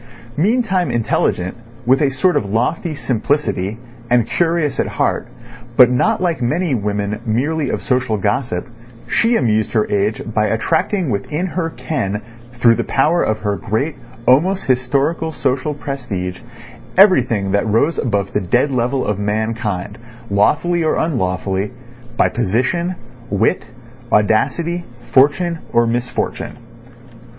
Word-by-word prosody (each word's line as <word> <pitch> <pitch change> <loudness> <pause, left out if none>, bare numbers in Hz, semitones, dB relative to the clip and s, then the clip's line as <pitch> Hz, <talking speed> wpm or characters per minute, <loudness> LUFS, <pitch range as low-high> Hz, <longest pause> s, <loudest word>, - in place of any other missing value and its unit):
Meantime 195 - +1
intelligent, 90 -5 0 0.3
with 130 +4 +4
a 145 - +3
sort 150 +7 +1
of 145 - +2
lofty 150 - -1
simplicity, 115 -6 -1 0.3
and 120 -2 +3
curious 165 -4 0
at - - +1
heart, - - -1 0.5
but 125 -1 +8
not 210 - +2
like 175 -6 -1
many 155 +6 0
women 105 -2 -2
merely 140 +7 0
of - - -3
social 125 -4 0
gossip, 105 -1 -1 0.4
she 235 +1 +2
amused 110 - +1
her 110 -3 +2
age 105 +1 +1
by 105 0 +2
attracting 165 - 0
within 150 - -2
her 175 -2 -2
ken 115 -12 -3 0.4
through 120 -1 +5
the - - -1
power 155 +6 +2
of 110 - +1
her 105 -1 0
great, 110 - -2 0.3
almost 180 +10 +4
historical, 140 +6 0
social 140 0 -1
prestige 105 -11 -4 0.6
everything 125 - +4
that 100 +2 +1
rose 115 +10 +2
above 100 -6 -1
the 105 - +1
dead 120 +10 +1
level 125 +1 0
of 105 -1 -1
mankind, 105 -1 -2 0.3
lawfully 160 +12 +2
or 155 - +1
unlawfully, 95 - -1 0.5
by - - +4
position, 125 - 0 0.3
wit, - - +1 0.5
audacity, 160 - +1 0.3
fortune 160 +5 +3
or 120 0 +3
misfortune. 120 +1 -2
125 Hz, 130 wpm, -18 LUFS, 105-160 Hz, 0.6 s, but